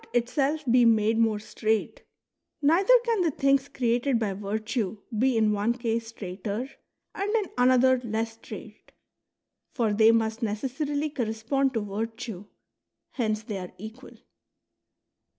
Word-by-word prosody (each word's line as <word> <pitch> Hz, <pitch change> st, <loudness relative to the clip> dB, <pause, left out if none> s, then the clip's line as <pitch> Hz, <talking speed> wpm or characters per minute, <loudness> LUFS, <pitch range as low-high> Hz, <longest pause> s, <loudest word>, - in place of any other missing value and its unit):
itself 275 Hz, +5 st, 0 dB
be 245 Hz, 0 st, +4 dB
made 225 Hz, -1 st, +3 dB
more 225 Hz, -2 st, +3 dB
straight, 215 Hz, +1 st, -2 dB, 0.6 s
neither 330 Hz, +9 st, +3 dB
can 455 Hz, -4 st, +1 dB
the 340 Hz, -, +2 dB
things 275 Hz, -1 st, +2 dB
created 245 Hz, +1 st, +1 dB
by 215 Hz, -4 st, -1 dB
virtue 215 Hz, +1 st, -3 dB, 0.2 s
be 250 Hz, +2 st, +2 dB
in 215 Hz, -1 st, +3 dB
one 210 Hz, +3 st, +1 dB
case 230 Hz, -2 st, -2 dB
straighter 205 Hz, +2 st, -5 dB, 0.5 s
and 410 Hz, +3 st, -2 dB
in 430 Hz, -3 st, +2 dB
another 255 Hz, +1 st, +4 dB
less 225 Hz, 0 st, -2 dB
sti 225 Hz, -, -10 dB
aight. -, -, -13 dB, 0.9 s
For 225 Hz, -5 st, +1 dB
they 220 Hz, +2 st, +6 dB
must 225 Hz, 0 st, 0 dB
necessarily 280 Hz, +7 st, -2 dB
correspond 255 Hz, +2 st, -1 dB
to 225 Hz, -, +1 dB
virtue; 220 Hz, 0 st, -5 dB, 0.7 s
hence 215 Hz, -4 st, -1 dB
they 210 Hz, -2 st, -5 dB
are 180 Hz, -1 st, -8 dB
equal. 220 Hz, +6 st, -11 dB
230 Hz, 135 wpm, -27 LUFS, 215-265 Hz, 0.9 s, they